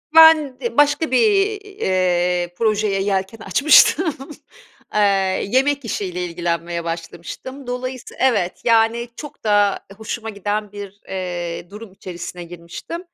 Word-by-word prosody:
Ben 310 -5 +7
d 235 -2 -4
başka 290 +1 +3
bir, 405 - +3
eee, 180 - 0
projeye 210 -3 +1
yelken 195 +2 -1
açmıştım. 300 - +4 0.8
Eee, 210 - +2 0.5
yemek 270 +2 +2
işiyle 180 -4 -3
ilgilenmeye 170 0 -3
başlamıştım. 170 +10 -7
Dolayısı 255 0 -5
Evet. 215 -9 +1
Yani, 230 +1 +3
çok 295 +3 -10
da 205 -2 +3 0.2
hoşuma 225 +1 -5
giden 205 0 -3
bir, 205 -1 -9
eee, 175 -2 -4
durum 210 0 -10
içerisine 180 -1 -8
girmiştim. 170 - -8
210 Hz, 115 wpm, -20 LUFS, 180-260 Hz, 0.8 s, Ben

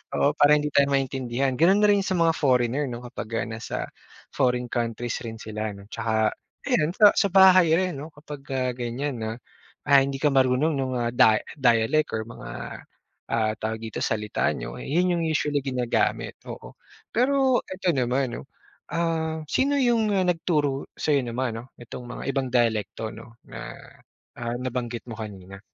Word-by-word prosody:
Oo, 145 - +3
para 150 0 +5
hindi 150 0 -1
tayo 140 0 +4
maintindihan. 135 -1 -1
Ganun 195 +5 +5
rin 205 -1 +5
sa 190 -1 -1
mga 165 -1 +4
foreigner 130 -1 +1
'no, 120 0 -6
kapag, 120 -2 -7 0.2
ah, - - -6
nasa 110 0 -5 0.5
foreign 125 -1 0
countries 120 0 -2
rin 110 - -6
sila 110 -1 -5
'no, 100 +2 -14
'tsaka 110 -1 +1 0.3
ayan 160 +5 +1
sa 210 -2 +7
sa 200 - +2
bahay 185 -2 +7
rin 180 -5 -1
'no 150 - -7
kapagka 135 -4 -4
ganyan 125 +2 -4
na, 110 0 -3 0.5
ah, 140 -1 +6
hindi 135 0 -1
ka 145 +1 +1
marunong 130 +3 +3
nung, 130 -3 -2
ah, 120 -1 -1
da 110 -2 +5 0.2
dialect 120 +3 +2
or 110 - -2
mga, 115 +1 -10 0.8
ah, 110 -2 +1
tawag 110 +1 -4
dito, - - -5
salita 105 -2 -1
niyo, - - -7
yun 175 +3 +1
yung - - -1
usually 150 -2 0
ginagamit, 125 -3 -1
oo. - - -9 0.3
Pero 260 +1 +3
'eto 185 -2 -1
naman 130 -1 0
'no, - - -13 0.4
ah, 160 -2 -1
sino 280 +2 +2
yung, 230 -4 +2
ah, 190 - +2
nagturo 150 -5 0
sa'yo 145 -4 +1
naman 120 0 -2
'no, 125 +2 -13
nitong 120 +1 -9
mga 125 - -7
ibang 135 -1 -1
dialekto 110 -2 0
'no 115 +1 -13
na, - - -8 0.6
ah, 120 0 -3
nabanggit 125 -2 -4
mo 115 - -6
kanina? 100 -2 -8
130 Hz, 165 wpm, -25 LUFS, 115-155 Hz, 0.8 s, sa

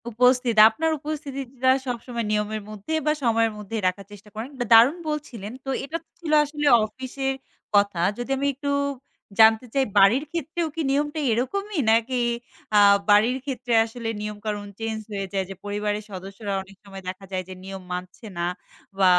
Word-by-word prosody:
উপস্থিত, 250 +1 +3
আপনার 320 +8 -1
উপস্থিতিটা 275 -4 -3 0.2
সবসময় 235 -1 -3
নিয়মের 210 0 -1
মধ্যে 215 +8 -6
বা 305 - +4
সময়ের 230 -1 +3
মধ্যেই 210 +1 -4
রাখার 195 +2 -2
চেষ্টা 205 +1 -13
করেন 230 +6 -5
বা 245 - 0
দারুণ 240 +9 +7
বলছিলেন। 255 -9 -5
তো - - -4
এটা 315 +4 -3
তো - - -57
ছিল 330 -3 -4
আসলে 295 0 -2 0.2
অফিসের 260 +4 -4 0.4
কথা। 200 -3 +3 0.2
যদি 245 +1 -5
আমি 280 +1 0
একটু 285 +2 -4 0.7
জানতে 220 +2 +7
চাই 270 -1 +2
বাড়ির 200 +8 +6
ক্ষেত্রেও 335 +1 -2
কি 330 - -1
নিয়মটা 295 +2 0
এরকমই? 390 - -1
নাকি 230 +3 +2 0.6
আ - - +7 0.3
বাড়ির 215 +5 +5
ক্ষেত্রে 250 -3 -3
আসলে 230 0 -7
নিয়মকানুন 210 0 -4
চেঞ্জ 225 -1 -3
হয়ে 200 -1 -3
যায়? 195 -1 +1
যে 195 - -6
পরিবারের 210 +1 -2
সদস্যরা 195 +2 -6
অনেক 195 +1 -14
সময় 195 -1 -10
দেখা 185 +1 -6
যায় 185 -1 -2
যে, - - -6
নিয়ম 195 0 -7
মানছে 180 +5 -7
না 170 - -1 0.6
বা 190 - +5
225 Hz, 165 wpm, -24 LUFS, 205-270 Hz, 0.7 s, দারুণ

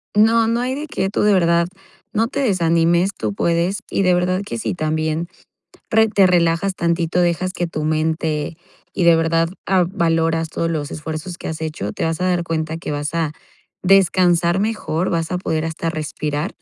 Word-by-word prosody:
No, 225 +2 +4
no 230 +1 +1
hay 255 +1 -1
de 295 +2 -5
qué. 195 -9 -2
Tú - - -1
de 210 0 +4
verdad 170 -2 +3 0.5
no 225 0 +2
te 280 - -4
desanimes. 170 -4 +2
Tú 105 -2 -3
puedes. 170 - 0
Y 195 - 0
de 185 -1 +4
verdad 180 +1 +1
que - - -5
si 225 - -2
también 155 0 -1 0.6
re 220 0 +4
te 200 -3 +4
relajas 175 +1 +2
tantito, 170 0 0
dejas 175 +1 0
que 175 - -2
tu 155 -2 -4
mente 155 0 -1 0.4
y 180 - 0
de 170 -1 +6
verdad, 165 0 +1 0.2
ah, 185 -2 +3
valoras 165 -2 +1
todos 165 +1 -2
los 150 -3 -3
esfuerzos 155 +3 -6
que - - -6
has 160 -1 -5
hecho. 150 -11 -4
Te - - -3
vas 165 +1 -1
a - - 0
dar 180 -1 +1
cuenta 160 -1 -3
que 165 - -6
vas 145 +2 -3
a 165 -3 0 0.5
descansar 180 -2 +4
mejor. 195 -5 -1
Vas 165 -2 -1
a 180 - 0
poder 160 -3 -2
hasta 165 +1 -3
respirar, 150 -1 -3
170 Hz, 190 wpm, -20 LUFS, 160-185 Hz, 0.6 s, de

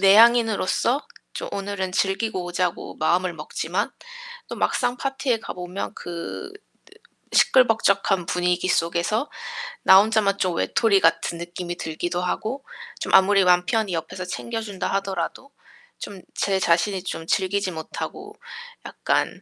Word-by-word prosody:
내향인으로서 230 +4 +4 0.3
좀 - - -5
오늘은 195 -2 -3
즐기고 195 0 0
오자고 175 0 -2
마음을 175 +3 +1
먹지만 165 +5 -3 0.6
또 - - -6
막상 245 +1 0
파티에 270 -3 -1
가보면 180 0 -6
그 170 - -6 0.8
시끌벅적한 200 -6 +4
분위기 180 0 0
속에서 175 - 0 0.5
나 190 0 +9
혼자만 210 -1 +2
좀 185 -3 0
외톨이 205 +2 +3
같은 165 0 +2
느낌이 175 0 -6
들기도 175 +2 -3
하고 220 +9 -3 0.4
좀 - - -4
아무리 195 +1 +6
남편히 180 +3 +2
옆에서 185 +3 -4
챙겨준다 220 0 -4
하더라도 195 +6 -3 0.5
좀 200 -2 -8
제 195 -1 +1
자신이 180 +2 +1
좀 165 -3 -5
즐기지 190 +1 0
못하고 160 -2 -7 0.5
약간 - - -1
190 Hz, 285 characters per minute, -23 LUFS, 175-215 Hz, 0.8 s, 나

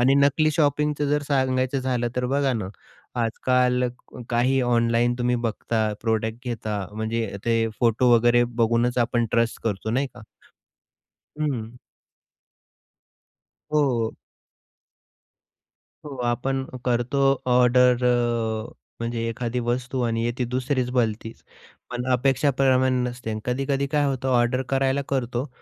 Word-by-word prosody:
आणि 130 +3 +4
नकली 140 +2 +3
शॉपिंगच 150 0 +1
जर 150 0 +1
सांगायचं 130 -1 +1
झालं, 125 -2 -1
तर 125 0 0
बघा 140 0 +1
ना 105 -6 -3 0.5
आजकाल 125 +2 +1 0.4
काही 125 +3 +2
ऑनलाईन 120 0 +2
तुम्ही 125 0 +1
बघता 115 -1 -1
प्रॉडक्ट 110 +2 -1
घेता, 110 -4 -3
म्हणजे 110 -1 -3
ते 115 -1 +2
फोटो 120 +1 +3
वगैरे 120 +1 +4 0.2
बघूनच 120 +2 +2
आपण 120 0 +1
ट्रस्ट 115 0 +1
करतो 110 0 -2
नाही 135 +4 +1
का. 125 - -12 1.2
हं. 125 -6 -3 2.0
हो. 125 -7 +1 1.9
हो, 140 -3 -7
आपण 130 +3 -1 0.2
करतो 120 +2 0 0.3
ऑर्डर 125 0 +4
अ, 120 -2 0 0.3
म्हणजे 115 0 -2
एखादी 120 +1 -3
वस्तू 125 +2 -2
आणि 115 -1 0
येती 120 +1 -1
दुसरीच 130 0 -1
भलतीच, 115 -2 -2 0.5
पण 125 0 -3
अपेक्षेप्रमाणे 130 0 +2
नसते. 120 -3 -5
कधी-कधी 135 +2 -1
काय 145 +1 +1
होतं 135 -1 -1
ऑर्डर 125 +1 +2
करायला 135 +1 +1
करतो 125 0 -1
125 Hz, 115 wpm, -24 LUFS, 115-130 Hz, 2.0 s, आणि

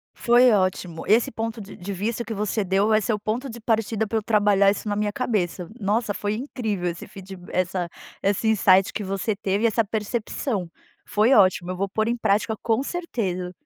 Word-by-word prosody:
Foi 245 +1 +5
ótim,o 185 -4 0
esse 225 +3 +3
ponto 225 0 -4
de 200 - -10
de 195 +2 -6
vista 220 +5 -2
que 230 - -5
você 210 +1 -1
deu 195 +2 +2
vai 215 0 +3
ser 220 - 0
o 210 - -2
ponto 235 +6 -3
de 235 +1 -8
partida 220 -1 0
pra 225 - -1
eu 220 - -2
trabalhar 205 -2 +4
isso 210 - -5
na 205 - 0
minha 210 0 0
cabeça, 190 -8 -1
nossa 210 +1 0
foi 205 +1 -2
incrível 220 -7 -3
esse 170 0 -7
feedba 190 -2 -11
essa 185 -1 -1 0.3
esse 200 +3 +1
insight 195 -3 +4
que 210 - -3
você 195 +2 -2
teve 200 +1 -1
e - - +6
essa 230 +1 +2
percepção 215 - -3 0.4
foi 215 +5 +3
ótimo 185 -4 +4
eu 185 - -5
vou 195 +1 -1
pôr 220 +3 0
em 240 +1 0
prática 220 0 +1
com 225 +2 +1
certeza. 200 - -3
210 Hz, 200 wpm, -24 LUFS, 190-225 Hz, 0.4 s, e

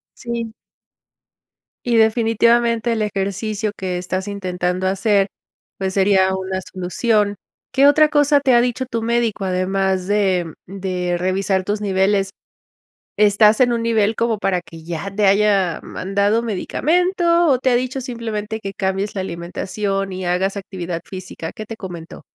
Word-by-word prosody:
Sí. 235 -2 -5 1.3
Y 240 -1 +1
definitivamente 230 +1 +3
el 220 - -1
ejercicio 205 +1 -2
que 185 -2 -3
estás 185 +2 -3
intentando 185 -2 -2
hacer, 195 +1 +2 0.5
pues 190 -1 -2
sería 190 -1 +3
una 190 0 -3
solución. 205 +3 0 0.4
¿Qué 275 +1 +5
otra 305 +1 +5
cosa 290 -1 +4
te 265 -3 +2
ha 240 - +6
dicho 250 +1 -1
tu 230 -2 -3
médico, 230 -3 0
además 190 0 0
de 190 -5 +1
de 180 -2 -2
revisar 190 +1 0
tus 205 +2 -2
niveles? 195 0 +1 0.9
¿Estás 210 +2 +5
en 245 -1 +4
un 230 - -1
nivel 225 -2 +2
como 230 -2 0
para 185 -3 0
que 165 -1 -13
ya 175 +4 -5
te 210 -1 +2
haya 195 -3 +3
mandado 200 +4 0
medicamento 340 - +1
o 260 -3 +4
te 260 0 +1
ha - - +3
dicho 255 +2 -2
simplemente 225 -4 -4
que 195 -1 -5
cambies 195 +2 -2
la 190 - -2
alimentación 195 +3 -3
y 185 0 -5
hagas 190 +3 0
actividad 180 -3 -5
física? 185 -3 -7
¿Qué 215 - -8
te 225 - -7
comentó? 175 -6 -9
200 Hz, 150 wpm, -20 LUFS, 190-230 Hz, 1.3 s, ha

